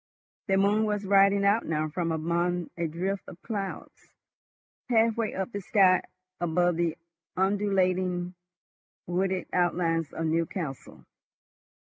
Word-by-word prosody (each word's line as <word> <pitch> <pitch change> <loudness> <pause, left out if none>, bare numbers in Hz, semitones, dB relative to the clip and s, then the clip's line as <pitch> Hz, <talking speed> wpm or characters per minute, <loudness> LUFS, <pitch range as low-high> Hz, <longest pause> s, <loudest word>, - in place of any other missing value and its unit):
The 195 -1 +2
moon 205 +3 +3
was 210 -1 -1
riding 200 0 +4
out 205 +3 +3
now 155 -1 0
from 165 +2 -2
among 170 +2 -1
a 170 -1 -1
drift 185 +5 -2
of 175 - -11
clouds, 200 -4 -6 0.8
halfway 225 -1 +2
up 190 +4 -3
the 200 - -4
sky 190 -2 +4 0.4
above 175 0 +1
the 170 -1 0 0.4
undulating 185 -2 +1 0.7
wooded 185 +1 -1
outlines 170 -3 +1
of 165 - -3
Newcastle. 160 -3 -3
185 Hz, 115 wpm, -28 LUFS, 170-200 Hz, 0.8 s, riding